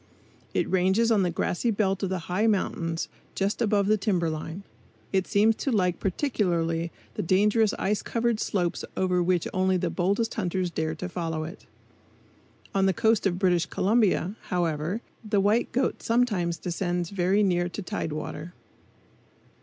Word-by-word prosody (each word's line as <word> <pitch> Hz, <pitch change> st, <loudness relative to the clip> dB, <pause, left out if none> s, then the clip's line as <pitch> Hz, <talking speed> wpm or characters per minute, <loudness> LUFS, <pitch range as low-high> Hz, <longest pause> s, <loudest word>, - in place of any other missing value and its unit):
It -, -, +1 dB
ranges 190 Hz, +5 st, +2 dB
on 215 Hz, -3 st, +4 dB
the 180 Hz, -, +2 dB
grassy 175 Hz, +6 st, -1 dB
belt 195 Hz, -3 st, +1 dB
of 195 Hz, -, -1 dB
the 190 Hz, -, -1 dB
high 190 Hz, +5 st, +1 dB
mountains 170 Hz, -5 st, 0 dB, 0.3 s
just 200 Hz, +4 st, -1 dB
above 205 Hz, -3 st, +2 dB
the 215 Hz, +1 st, +3 dB
timber 180 Hz, -5 st, +1 dB
line. 160 Hz, +4 st, -6 dB, 0.5 s
It 190 Hz, -1 st, +1 dB
seems 215 Hz, +2 st, +4 dB
to 275 Hz, -, -1 dB
like 180 Hz, -5 st, +1 dB
particularly 170 Hz, -, 0 dB, 0.2 s
the -, -, -3 dB
dangerous 210 Hz, +4 st, +3 dB
ice 205 Hz, +2 st, 0 dB
covered 235 Hz, -1 st, 0 dB
slopes 180 Hz, -6 st, -1 dB
over 180 Hz, -1 st, +2 dB
which 175 Hz, -1 st, +1 dB
only 185 Hz, 0 st, +2 dB
the -, -, -1 dB
boldest 200 Hz, +5 st, 0 dB
hunters 185 Hz, -3 st, -1 dB
dare 160 Hz, -1 st, -2 dB
to 180 Hz, +3 st, -5 dB
follow 165 Hz, -3 st, -3 dB
it. 165 Hz, +5 st, -9 dB, 1.1 s
On 195 Hz, 0 st, +3 dB
the 190 Hz, -, +3 dB
coast 225 Hz, -2 st, +2 dB
of 180 Hz, -2 st, -1 dB
British 175 Hz, -3 st, +2 dB
Columbia, 205 Hz, -2 st, +2 dB
however, 170 Hz, +3 st, -1 dB, 0.2 s
the 210 Hz, -2 st, +1 dB
white 210 Hz, +4 st, +2 dB
goat 265 Hz, +1 st, 0 dB
sometimes 205 Hz, -8 st, +1 dB
descends 175 Hz, 0 st, -2 dB
very 195 Hz, +2 st, +2 dB
near 175 Hz, -2 st, +1 dB
to 205 Hz, -, -6 dB
tide 165 Hz, -2 st, -3 dB
water. 155 Hz, +2 st, -5 dB
190 Hz, 160 wpm, -27 LUFS, 175-210 Hz, 1.1 s, on